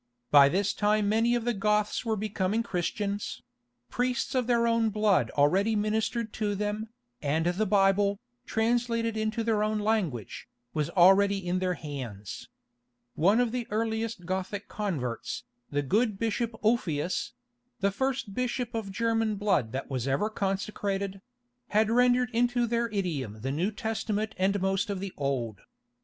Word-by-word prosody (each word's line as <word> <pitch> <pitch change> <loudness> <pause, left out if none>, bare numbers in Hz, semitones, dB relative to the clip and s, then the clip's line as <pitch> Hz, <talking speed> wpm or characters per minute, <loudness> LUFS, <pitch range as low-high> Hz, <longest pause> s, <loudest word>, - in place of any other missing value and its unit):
By 140 -1 +8
this 195 +5 +1
time 210 0 +2
many 225 +3 +3
of 235 -1 -2
the 240 - +1
Goths 210 +2 +1
were 225 -2 0
becoming 210 +1 -1
Christians: 200 +1 -3 0.5
priests 245 0 -1
of 255 -3 +1
their 235 -1 +3
own 230 -1 +2
blood 205 - +2
already 190 +10 +3
ministered 220 +2 -1
to 205 -2 -1
them, 210 +2 -2 0.3
and 155 +3 0
the 180 +5 +1
Bible, 200 0 +3 0.3
translated 230 0 +1
into 220 +1 -1
their 220 -2 +1
own 215 0 0
language, 205 - -2 0.2
was 150 -2 -1
already 195 +2 +5
in 180 +1 +1
their 185 -1 0
hands. 120 - -7 0.6
One 195 +8 +3
of 245 -2 +2
the 245 -1 -3
earliest 220 -2 -2
Gothic 190 +2 -3
converts, 145 - -3 0.3
the 145 0 -1
good 210 - +1
Bishop 230 +1 -1
Ulfilas—the 235 +4 -1
first 260 -2 -2
bishop 245 +1 -2
of 220 -4 -3
German 225 0 +1
blood 195 - +1
that 135 +3 -4
was 130 -1 -2
ever 140 +11 +1
consecrated—had 210 +4 -2
rendered 245 +1 +3
into 240 +1 +2
their 235 0 0
idiom 150 - -3
the 135 +3 -2
New 170 +8 0
Testament 220 -1 -2
and 195 +2 +2
most 195 +1 0
of 200 -2 -2
the 195 -1 -5
Old. 130 -6 -2
210 Hz, 145 wpm, -28 LUFS, 185-230 Hz, 0.6 s, By